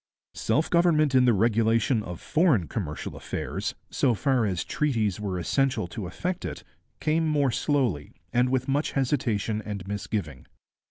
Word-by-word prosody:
Self 145 +8 +1
government 165 -4 +3
in 130 -1 +5
the 120 - +5
regulation 115 +2 +2
of 90 -5 -7
foreign 150 - +2
commercial 80 -9 -4
affairs, - - -4 0.2
so 125 -4 +2
far 130 -1 +1
as 90 -3 -1
treaties 110 -11 0
were 100 -3 -3
essential 135 +6 +1
to 100 -1 -5
effect 180 - -3
it, - - -5 0.4
came 160 +1 +1
more 145 -4 +2
slowly, 120 - 0 0.2
and 125 +1 +3
with 130 +1 0
much 140 +3 0
hesitation 115 -6 0
and 100 -3 -6
misgiving. 100 -8 -4
120 Hz, 150 wpm, -26 LUFS, 105-140 Hz, 0.4 s, in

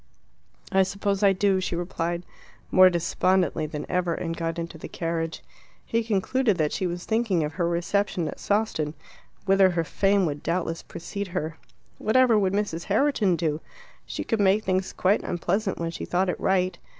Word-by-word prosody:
"I 190 - +4
suppose 200 +1 -1
I 200 -1 +6
do," 195 0 +2
she 180 - -2
replied, 170 0 -2 0.5
more 185 0 +8
despondently 175 -1 +1
than 150 -1 -5
ever, 180 -2 0
and 165 -1 -3
got 165 -1 -3
into 170 -1 -5
the - - -7
carriage. 165 -1 -3 0.4
He 230 0 0
concluded 220 +1 +1
that 155 -3 +1
she 185 - -1
was 175 0 -5
thinking 220 -7 +1
of 150 0 -3
her 170 +2 0
reception 175 0 0
at - - -6
Sawston, 200 -8 0 0.5
whither 195 -1 +5
her 170 -2 0
fame 195 +3 +2
would 145 -2 -3
doubtless 165 0 -2
precede 200 +4 -6
her. 160 -1 -3 0.4
Whatever 235 -1 +4
would 190 -2 +1
Mrs. 200 -5 -1
Herriton 215 -4 +2
do? 160 -2 -1 0.5
She - - -4
could 225 - -1
make 200 +2 +3
things 185 -1 0
quite 195 +3 +2
unpleasant 190 +4 -1
when 165 0 -2
she - - -6
thought 185 +1 +1
it - - -2
right. 185 -2 +1
185 Hz, 175 wpm, -26 LUFS, 170-200 Hz, 0.5 s, more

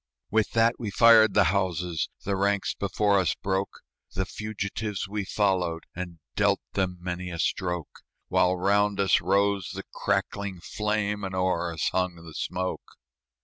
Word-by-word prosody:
With 110 0 +1
that 115 +1 +3
we 110 - -3
fired 110 0 +6
the 105 - +6
houses; 90 -4 -1 0.2
The 100 0 0
ranks 100 +1 +1
before 100 0 +1
us 95 - +1
broke; 95 0 -2 0.3
The 95 - 0
fugitives 105 -1 -4
we 100 0 -3
followed, 90 -5 0
And 90 -1 -6 0.2
dealt - - +2
them 95 -2 -1
many 90 0 -4
a 85 - -5
stroke, 90 -2 -2 0.3
While 90 0 +3
round 100 +2 +2
us 100 -1 +4
rose 100 -2 +1
the - - -5
crackling 100 -3 -1
flame, 105 +2 -2
And 95 -1 -4
o'er 90 -2 0
us 80 -2 -1
hung 90 -1 0
the 85 -1 -12
smoke. 95 +3 -4
95 Hz, 150 wpm, -27 LUFS, 90-100 Hz, 0.3 s, fired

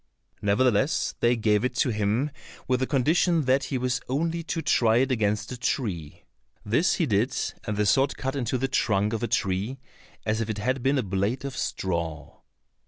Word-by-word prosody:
Nevertheless 110 +5 +2
they 120 +1 +3
gave 105 -1 +2
it 125 0 -1
to - - +2
him 110 +7 0 0.4
with 125 -1 +2
the 130 - 0
condition 160 +4 +2
that 135 +1 +2
he 130 0 -2
was 125 0 -1
only 165 +5 0
to 165 0 -3
try 115 -1 +3
it 130 +2 +2
against 105 -3 0
a 125 - -5
tree. 95 - -3 0.4
This 120 - +2
he 170 - +1
did, 115 0 +1 0.3
and 105 -1 -2
the 105 - +2
sword 135 +7 +2
cut 135 +1 -3
in 135 - -1
two 130 - 0
the 135 +2 0
trunk 105 -5 +1
of 115 - -2
a 120 - 0
tree 105 +1 -1 0.5
as 110 +1 0
if 115 - -3
it 110 - -2
had 130 +5 -1
been 135 +3 +2
a 130 - +1
blade 100 +7 -1
of 135 -2 -5
straw. 85 -5 -3
120 Hz, 195 wpm, -26 LUFS, 105-135 Hz, 0.5 s, they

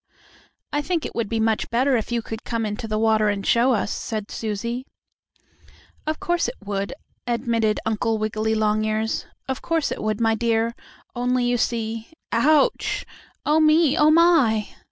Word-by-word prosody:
"I 290 - +1
think 330 +1 -1
it - - -5
would 230 -3 -2
be 225 - -1
much 220 -1 +1
better 255 +3 +2
if 225 0 -2
you 235 -1 0
could 225 +1 -7
come 230 -2 -2
into 215 +2 -4
the 215 0 -1
water 220 -1 +3
and 200 -1 -2
show 245 +3 +4
us," 205 -2 0
said 215 -2 -4
Susie. 235 +4 -3
"Yes, - - -33 0.3
of 310 0 -1
course 345 -4 0
it 245 - -5
would," 200 -1 -2 0.4
admitted 230 -2 +1
Uncle 220 0 0
Wiggily 215 +1 -1
Longears. 215 +1 0 0.2
"Of 265 0 -3
course 330 -3 0
it - - -4
would, 215 -1 -1
my 225 -1 +3
dear, 230 0 +1 0.4
only 245 0 +1
you 245 0 +2
see 225 0 -2 0.2
ouch! 285 +5 +2 0.4
Oh, 305 +1 +4
me! 310 -1 +4
Oh, 300 0 +5
my!" 310 -11 +4
230 Hz, 170 wpm, -23 LUFS, 215-255 Hz, 0.4 s, Oh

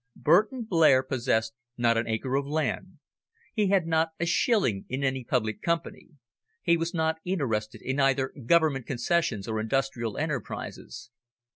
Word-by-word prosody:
Burton 215 - +3
Blair 160 -10 +4
possessed 120 -4 0 0.2
not 120 -1 +3
an 115 0 0
acre 115 +4 -2
of 140 +1 0
land; 160 +4 -2 0.6
he 210 -3 +1
had 190 -3 +2
not 160 0 +1
a 170 - 0
shilling 195 - +1
in 130 +2 -3
any 130 -1 0
public 110 -3 -1
company; 170 0 -2 0.6
he 170 - +4
was 165 0 -2
not 160 -2 0
interested 120 - -2
in 130 +2 -2
either 135 -1 +2
Government 155 -6 +3
concessions 125 - 0
or 110 -1 -2
industrial 120 -1 -1
enterprises. 135 -5 -5
135 Hz, 145 wpm, -27 LUFS, 120-170 Hz, 0.6 s, Blair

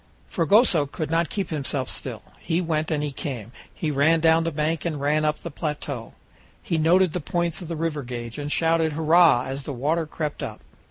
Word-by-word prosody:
Fragoso 170 - +4
could 155 +2 -5
not 165 0 +1
keep 195 -5 -3
himself 140 -3 -1
still; - - -3 0.2
he 165 +1 -1
went 160 -3 -1
and 150 -2 0
he 145 - -2
came, 125 -5 -5 0.2
he 155 - -3
ran 155 +4 +3
down 160 0 +4
the 165 - -1
bank 155 +1 -1
and 160 -4 -2
ran 150 +2 +1
up 150 0 +1
the 170 - -8
plateau, 145 -5 -5 0.5
he 165 - -1
noted 175 +2 +4
the 180 - -1
points 170 +3 -1
of 175 - -7
the 165 - -3
river 155 -2 -2
gauge, 120 0 -6
and 145 0 -4
shouted 165 -1 +2
"Hurrah!" 160 -4 +5
as 135 +1 -4
the 140 +1 -5
water 155 +6 0
crept 150 -1 -4
up. - - -6
155 Hz, 205 wpm, -24 LUFS, 145-165 Hz, 0.5 s, Hurrah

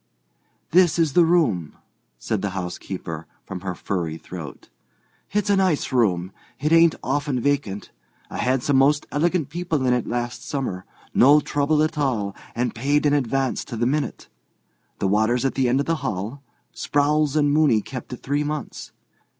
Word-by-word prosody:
"This 175 -2 +4
is 160 -5 +2
the 175 - +6
room," 115 - +1 0.4
said 105 - -2
the 95 -2 -3
housekeeper, 90 -3 -5 0.2
from 95 - -6
her 90 -1 -4
furry 85 -4 -3
throat. 80 -4 -9 0.6
"It's 210 0 0
a - - +5
nice 185 -8 +1
room. 95 -8 +1 0.3
It 150 +3 0
ain't 165 0 +6
often 140 -1 -1
vacant. 135 -7 -1 0.4
I - - -7
had 130 0 +1
some 140 -2 +2
most 145 +2 +3
elegant 165 0 +1
people 165 -3 -2
in 125 - +3
it 125 - -1
last 120 0 -3
summer—no 135 +4 +1
trouble 145 +2 +1
at 155 0 -1
all, 110 -9 -1 0.2
and 125 +1 -1
paid 145 +5 +1
in 145 - +4
advance 135 -1 0
to 115 - -6
the 120 - +1
minute. 140 +1 -2 0.7
The 95 - 0
water's 110 +6 +2
at 135 - +1
the 130 -2 +1
end 130 +3 +2
of 140 - 0
the 165 0 0
hall. 105 +8 -4 0.3
Sprowls 145 0 +1
and 145 -2 +3
Mooney 145 -9 +3
kept 130 -1 -8
it 125 - -8
three 145 +2 0
months. 150 -2 -5
135 Hz, 165 wpm, -23 LUFS, 110-150 Hz, 0.7 s, the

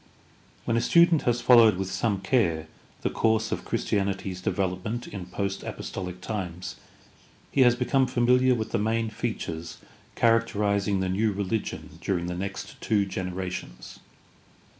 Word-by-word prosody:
— - - -31
When 115 - +1
a - - +2
student 170 +5 +5
has 120 0 0
followed 115 -6 +7
with 95 0 -3
some 95 +1 0
care 90 -7 +1 0.4
the - - 0
course 110 -1 +1
of - - -2
Christianity's 100 -2 -2
development 95 +6 -2
in 95 -3 -7
post 100 +1 -3
apostolic 90 -2 -6
times, 95 -4 -5 0.8
he 140 - +2
has 120 -1 +6
become 130 +1 +2
familiar 125 +1 +3
with 110 -2 -4
the - - +1
main 110 +1 0
features 85 -8 -4 0.4
char 115 0 +5
acterizing 100 -3 0
the 95 - -1
new 105 +4 +1
religion 100 +2 -4
during 90 -3 -1
the 90 - -3
next 95 +2 -6
two 105 -2 +2
generations. 90 -10 -5
100 Hz, 145 wpm, -26 LUFS, 95-115 Hz, 0.8 s, followed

